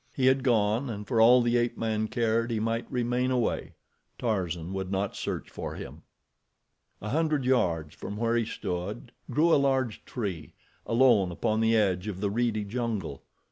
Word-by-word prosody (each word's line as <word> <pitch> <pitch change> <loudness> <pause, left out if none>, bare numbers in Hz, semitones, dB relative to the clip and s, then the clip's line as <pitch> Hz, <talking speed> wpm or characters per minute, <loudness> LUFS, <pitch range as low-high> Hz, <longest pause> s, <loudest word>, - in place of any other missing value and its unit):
He 130 - 0
had 130 +1 +4
gone, 115 +1 +2
and 105 -2 -6
for 115 -4 +2
all 120 +2 +7
the 120 0 +2
ape 120 0 0
man 110 -1 -1
cared, 115 0 0
he 115 -2 -1
might 115 +2 -2
remain 125 0 0
away—Tarzan 95 -7 -3
would 95 -1 -4
not 100 +1 -1
search - - -4
for - - -6
him. - - -9 1.0
A 105 - -3
hundred 155 -1 +1
yards 85 -12 +1
from 100 - -7
where 115 +1 +1
he 120 - +2
stood 100 +5 -5 0.2
grew 165 +3 +3
a - - +6
large 130 -5 0
tree, 95 - -5 0.3
alone 115 -6 +4
upon 110 +5 0
the 115 0 +3
edge 95 -2 +1
of 100 -3 -4
the 100 0 -1
reedy 115 -1 0
jungle. 105 - -3
115 Hz, 170 wpm, -28 LUFS, 100-125 Hz, 1.0 s, all